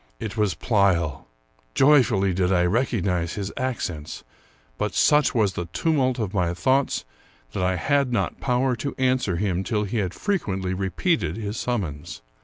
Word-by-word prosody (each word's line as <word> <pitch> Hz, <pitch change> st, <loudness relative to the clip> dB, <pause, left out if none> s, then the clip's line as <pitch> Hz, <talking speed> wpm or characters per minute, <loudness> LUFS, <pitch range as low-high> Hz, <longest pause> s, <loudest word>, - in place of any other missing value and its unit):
It 110 Hz, -3 st, -5 dB
was 105 Hz, -4 st, +1 dB
Pleyel. 85 Hz, -, +1 dB, 0.5 s
Joyfully 120 Hz, -9 st, +4 dB
did 90 Hz, +1 st, +1 dB
I 90 Hz, -2 st, +3 dB
recognize 95 Hz, -5 st, 0 dB
his 100 Hz, -1 st, -4 dB
accents; 90 Hz, -, -4 dB, 0.6 s
but 105 Hz, -1 st, -2 dB
such 150 Hz, -3 st, +4 dB
was 105 Hz, -4 st, +2 dB
the 90 Hz, -, -4 dB
tumult 135 Hz, -6 st, +1 dB
of 110 Hz, -5 st, -3 dB
my 90 Hz, -3 st, 0 dB
thoughts 130 Hz, +10 st, +1 dB, 0.5 s
that -, -, -3 dB
I 90 Hz, 0 st, +1 dB
had 140 Hz, +7 st, +1 dB
not 105 Hz, -5 st, -1 dB
power 125 Hz, 0 st, +1 dB
to 140 Hz, +5 st, -4 dB
answer 130 Hz, -7 st, +1 dB
him 95 Hz, 0 st, -1 dB
till 105 Hz, -1 st, -1 dB
he 105 Hz, +3 st, -3 dB
had 95 Hz, -4 st, -1 dB
frequently 95 Hz, -, -1 dB
repeated 95 Hz, -, -1 dB
his 105 Hz, 0 st, -4 dB
summons. 80 Hz, -, -4 dB
100 Hz, 155 wpm, -24 LUFS, 90-125 Hz, 0.6 s, Joyfully